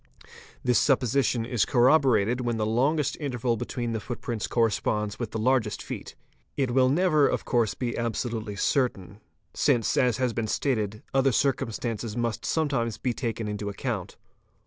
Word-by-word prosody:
This 125 -3 +3
supposition 125 -3 +2
is 120 -3 +1
corroborated 125 -3 +3
when 120 -2 -1
the 110 - 0
longest 140 +6 +1
interval 125 -5 -1
between 120 +1 -3
the 110 - -2
footprints 115 0 -4
corresponds 105 -2 0
with 120 -3 -3
the 110 - -4
largest 115 -2 +1
feet. - - -7 0.4
It 135 -3 +1
will 130 +1 +4
never 155 -1 +3
'of - - -2
course 120 -4 +1
be 120 -2 -3
absolutely 115 -2 -3
certain, 105 -3 -1 0.3
since, 125 -6 +2
as 125 -4 +3
has 125 -2 0
been 115 -1 -2
stated, 110 -4 -1
other 135 0 +3
circum 125 -1 +1
stances 115 0 -4
must 120 -2 -2
sometimes 135 -8 0
be 125 - -1
taken 115 -3 -3
into 105 0 -3
account. 100 - -4
120 Hz, 155 wpm, -27 LUFS, 110-130 Hz, 0.4 s, will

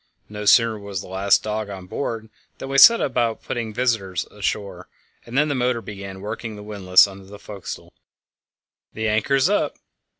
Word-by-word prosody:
No 105 0 -6
sooner 115 +1 +4
was 100 -2 -5
the - - -11
last 95 +2 +2
dog 110 -1 -3
on 95 -2 -8
board 110 +2 -5 0.3
than 135 - -7
we 135 0 +3
set 230 +10 +9
about 120 -4 -1
putting 120 -2 -3
all 110 - -9
visitors 110 -8 -1
ashore, 100 -3 -4 0.4
and 120 +3 -4
then 150 +1 +4
the 145 - -1
motor 125 -2 0
began 100 -2 -9
working 110 +1 -6
the 105 - -10
windlass 95 -3 +4
under 95 -1 -11
the 100 +2 -12
forecastle. 100 -2 -9 1.0
"The 110 0 -2
anchor's 130 +7 +2
up!" 205 +1 0
105 Hz, 175 wpm, -22 LUFS, 100-120 Hz, 1.0 s, set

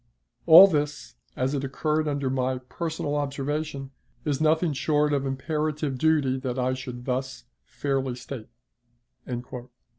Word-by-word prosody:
All 170 +4 +11
this, 150 -5 -2 0.2
as 130 +2 -1
it 140 -1 -1
occurred 155 +3 -1
under 140 -3 -1
my 130 0 0
personal 145 +3 -4
observation, 140 0 -3 0.3
it 150 - +1
is 140 +1 -2
nothing 160 +1 +2
short 150 +1 +1
of 140 -1 0
imperative 150 0 -2
duty 145 -4 +2
that 130 -1 -3
I 130 0 +1
should 125 -1 -7
thus 130 -1 -3 0.2
fairly 135 -3 -2
state." 125 -2 -8
140 Hz, 130 wpm, -26 LUFS, 130-150 Hz, 0.3 s, All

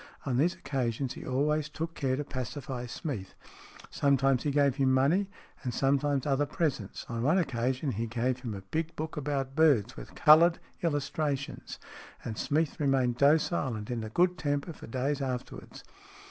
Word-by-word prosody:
On 130 -3 0
these 170 +6 +2
occasions 130 -1 -2
he - - -9
always 150 +3 +1
took 160 +2 -4
care 130 -4 0
to 145 - -2
pacify 130 -1 -5
Smeath. 115 - -5 0.6
Sometimes 135 -2 +2
he 150 - -1
gave 140 -2 +2
him 135 -1 +3
money, 155 +10 +3 0.3
and 125 -3 -3
sometimes 140 0 +1
other 145 0 +1
presents; 140 - -2
on 115 -1 -3
one 150 +9 +3
occasion 130 -3 0
he 115 +1 -2
gave 120 +2 -1
him 120 -5 -5
a 95 - -7
big 160 +1 -2
book 160 +1 -4
about 135 -2 -2
birds, 135 -8 +4
with - - -10
coloured 165 +3 +7 0.2
illustrations, 145 -3 -2 0.5
and 110 - -3
Smeath 155 +6 0
remained 135 -4 +2
docile 145 -2 +3
and 105 +2 -6
in 115 -2 -2
a 110 - -5
good 180 +9 +2
temper 145 +3 -1
for - - -11
days 135 +4 -1
afterwards. 130 -2 -5
140 Hz, 165 wpm, -30 LUFS, 125-150 Hz, 0.6 s, coloured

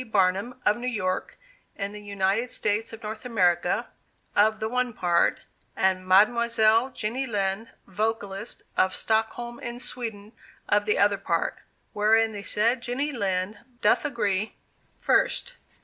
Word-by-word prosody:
BARNUM, 200 +1 +1
of 210 - +4
New 245 +1 -4
York, 185 -7 -2 0.4
in 200 -1 -3
the 210 0 -9
United 200 +3 0
States 220 0 -1
of 225 0 -10
North 215 +2 -6
America, 180 -8 +1 0.5
of 215 +1 +4
the 220 - -1
one 250 +1 -1
part, 175 -4 +2 0.3
and 185 -1 +1
Mademoiselle 225 +4 +4
JENNY 255 +3 -2
LIND, 205 0 -1 0.2
Vocalist, 205 +1 -3
of 185 0 +2
Stockholm 230 +2 -1
in 240 0 -5
Sweden, 225 -4 -4 0.4
of 205 0 +2
the 210 - +1
other 200 -1 +3
part, 170 -4 -1 0.3
wherein 220 +2 +3
the 205 -2 -6
said 230 +5 +2
Jenny 260 +5 -1
Lind 200 -4 -2 0.2
doth 210 - +3
agree: 215 -6 -1 0.5
1st. - - +2
215 Hz, 135 wpm, -26 LUFS, 200-235 Hz, 0.5 s, of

